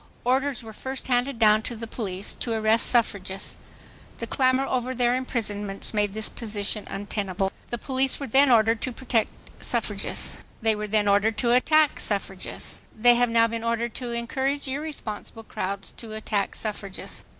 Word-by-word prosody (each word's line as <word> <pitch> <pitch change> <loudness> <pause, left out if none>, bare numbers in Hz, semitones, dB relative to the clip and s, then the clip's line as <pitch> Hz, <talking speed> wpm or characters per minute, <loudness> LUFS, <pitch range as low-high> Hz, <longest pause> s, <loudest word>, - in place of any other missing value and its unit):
Orders 265 +1 +1
were 220 -1 -9
first 265 +4 -6
handed 250 +1 +1
down 215 -1 +5
to 235 - -4
the 230 +1 -5
police 200 -4 -5
to 235 - -2
arrest 220 +1 +4
suffragists. 195 -5 0 0.6
The - - -4
clamor 260 0 +2
over 255 -1 -1
their 245 0 +3
imprisonments 210 -6 -3
made 205 -2 +1
this 220 0 0
position 210 -2 -3
untenable. 195 -2 -2 0.2
The 240 - -2
police 265 +2 0
were 280 - -3
then 270 +3 +5
ordered 225 -1 +4
to 260 - -1
protect 240 -2 0 0.3
suffragists. - - 0 0.2
They 220 -1 +3
were 210 0 -3
then 210 0 +2
ordered 205 +2 +3
to 235 +2 +2
attack 305 +4 +4
suffragists. 195 -2 -2 0.2
They 240 +2 +7
have 245 0 +3
now 230 0 +5
been 230 0 -3
ordered 230 0 -1
to 250 -2 -5
encourage 265 +4 -1
irresponsible 265 -6 -5
crowds 195 -2 -4
to 225 -2 -7
attack 210 -2 -1
suffragists. 205 -3 -6
230 Hz, 160 wpm, -26 LUFS, 210-255 Hz, 0.6 s, They